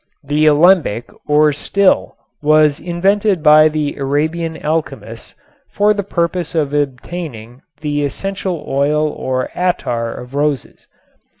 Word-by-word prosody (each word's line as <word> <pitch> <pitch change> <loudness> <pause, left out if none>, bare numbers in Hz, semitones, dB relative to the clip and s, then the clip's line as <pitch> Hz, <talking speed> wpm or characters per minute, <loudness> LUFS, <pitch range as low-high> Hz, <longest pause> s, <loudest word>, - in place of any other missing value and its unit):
The 150 +2 +1
alembic 155 - +3 0.2
or 150 0 +4
still 195 +7 +1 0.2
was 150 0 +3
invented 190 +1 0
by 155 0 +7
the 150 -1 -3
Arabian 160 +4 -1
alchemists 155 +1 -4 0.3
for 210 +1 +2
the 205 - -2
purpose 175 -2 -2
of 145 -3 0
obtaining 135 -3 -4 0.2
the 145 -1 -1
essential 185 +3 -4
oil 150 +3 +1
or 130 -3 -3
attar 120 -10 -1
of 125 +2 -10
roses. 145 -1 -2
150 Hz, 115 wpm, -16 LUFS, 145-175 Hz, 0.3 s, by